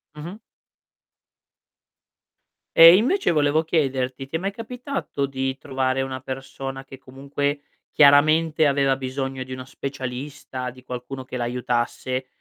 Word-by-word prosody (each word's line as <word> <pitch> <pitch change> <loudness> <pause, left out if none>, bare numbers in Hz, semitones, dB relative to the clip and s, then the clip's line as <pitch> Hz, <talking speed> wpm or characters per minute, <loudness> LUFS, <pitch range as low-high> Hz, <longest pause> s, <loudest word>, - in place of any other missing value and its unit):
Mh-mh. 170 +7 -8 2.4
Ehm, 165 +2 +10
invece 275 - +2
volevo 150 0 +2
chiederti: 135 -4 -1
ti 160 - -6
è - - +1
mai 195 +2 -2
capitato 245 - -4
di 135 0 -3
trovare 130 -1 -1
una 130 -1 -4
persona 135 0 -6
che 135 0 -12
comunque, 140 +2 -3 0.3
chiaramente, 155 +2 +5
aveva 140 -1 +2
bisogno 135 0 -4
di 130 0 -8
uno 130 0 -7
specialista, 130 -1 -6
di 125 +1 -14
qualcuno 125 +1 -6
che 130 - -6
l'aiutasse, 125 +1 -2
135 Hz, 120 wpm, -23 LUFS, 130-150 Hz, 2.4 s, Ehm